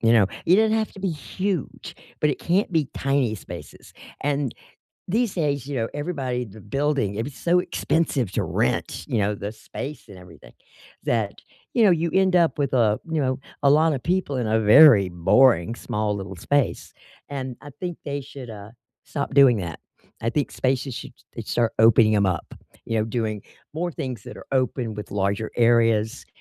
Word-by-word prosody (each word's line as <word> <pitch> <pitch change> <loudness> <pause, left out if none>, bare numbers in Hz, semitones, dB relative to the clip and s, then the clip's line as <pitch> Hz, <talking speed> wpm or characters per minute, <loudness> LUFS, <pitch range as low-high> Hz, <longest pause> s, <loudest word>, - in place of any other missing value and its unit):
You 115 0 +4
know? 110 -4 +5 0.2
It 175 +3 +5
doesn't 220 +1 +3
have 220 -1 -1
to - - -12
be 190 0 -1
huge, 180 +3 -4 0.2
but 150 - +2
it 145 - -2
can't 185 +2 +1
be 155 -4 +1
tiny 135 -5 0
spaces. - - -11 0.3
And 140 -3 0 0.6
these 225 +2 0
days, 145 -6 -1
you 145 - -5
know, 115 -2 -1
everybody 140 -6 -2
in 115 - -8
the 110 - -12
building, 135 -3 -1
it 115 - -1
was 140 -1 -7
so 175 +1 +2
expensive 155 - 0
to - - 0
rent, 65 - -1
you 115 - 0
know, 105 0 +1
the 100 +1 -5
space 140 +6 -8
and 100 - -11
everything, 90 -3 -15 0.5
that, 110 -4 -1 0.3
you 235 - +4
know, 210 - +6
you 170 -1 +2
end 190 -1 +4
up 170 -2 +3
with 140 -3 -1
a, 110 -4 +2
you 160 -2 0
know, 130 -1 -1 0.2
a - - +6
lot 155 +2 +4
of 135 - -2
people 175 -3 -1
in 120 -3 -1
a 110 +1 +2
very 110 -3 +7
boring, 90 +3 +3
small 105 -4 -2
little 95 -2 -6
space, 145 +9 -1 0.4
and 130 -3 -5
I 145 - -10
think 175 -2 -4
they 140 -1 -3
should, 135 -2 -10
uh, 105 -1 -9 0.3
stop 140 -1 -4
doing 135 -4 +7
that. 85 -5 -5 0.4
I 115 - 0
think 145 +3 -1
spaces 130 0 -1
should - - -8 0.2
they - - -5
start 115 -2 0
opening 110 -1 +6
'em 100 -1 +3
up, 90 -3 -2 0.3
you 115 -1 -1
know, 110 - +1
doing 110 -2 -2 0.3
more 175 +2 -3
things 130 -6 -5
that 125 - -9
are - - -12
open 125 -3 0
with 105 -1 -8
larger 100 +2 -1
areas, 115 0 +2
130 Hz, 195 wpm, -24 LUFS, 110-150 Hz, 0.6 s, very